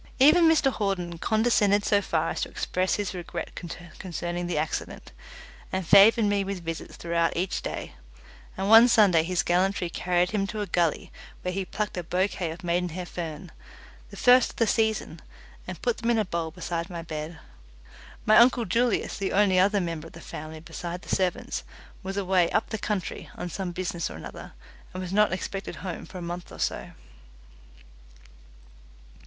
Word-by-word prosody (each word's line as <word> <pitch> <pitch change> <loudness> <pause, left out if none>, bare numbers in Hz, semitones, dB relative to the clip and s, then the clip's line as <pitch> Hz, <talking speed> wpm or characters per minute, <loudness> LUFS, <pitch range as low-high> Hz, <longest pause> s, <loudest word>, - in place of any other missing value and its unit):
Even 310 +6 +6
Mr 295 -4 +4
Hawden 180 -6 -2
condescended 215 -2 +2
so 205 -1 +3
far 165 -4 0
as - - -4
to - - -2
express 185 +1 -1
his 205 -2 -3
regret 175 -2 -6
concerning 175 0 -6
the 175 - -2
accident, 155 -1 -3 0.6
and 190 -1 -2
favoured 210 +5 +7
me 205 -1 +1
with 195 -3 -5
visits 165 0 -5
throughout 170 -1 0
each 180 +2 -1
day; - - -5 0.6
and 190 +1 -1
one 225 +3 +9
Sunday 205 -8 +5
his 175 +2 0
gallantry 180 0 +1
carried 180 +1 +1
him 200 -2 0
to 215 - -5
a - - -1
gully 170 -3 0 0.3
where 180 - -1
he 195 0 -2
plucked 210 0 -4
a 180 - -2
bouquet 180 0 -1
of 170 +4 -8
maidenhair 175 0 -1
fern 170 0 -6 0.6
the - - -11
first 250 0 +6
of - - -12
the 230 - +2
season 220 -1 0 0.5
and - - -7
put 480 - +1
them 230 - -1
in 235 - +3
a 215 - +1
bowl 170 -3 -2
beside 170 +1 -4
my 170 -2 -6
bed. 155 0 -6 0.9
My 215 - +6
uncle 240 0 +5
Julius, 235 +2 0
the 195 - -1
only 190 -2 +4
other 200 +2 +4
member 165 -3 -4
of - - -16
the 170 - -10
family 155 -1 -8
besides 175 +2 -7
the - - +1
servants, 185 -2 -1 0.4
was 195 +1 -5
away 185 -3 +2
"up 220 - 0
the 220 - -2
country" 205 -3 -3
on 175 - -5
some 185 +1 -4
business 175 -1 -3
or - - -8
another, - - -9 0.4
and 185 - -3
was 185 0 -5
not 210 -1 +4
expected 195 +2 -4
home 180 -3 -5
for 185 - -9
a 180 - -6
month 175 +1 -6
or - - -10
so. - - -3
185 Hz, 180 wpm, -26 LUFS, 170-205 Hz, 0.9 s, one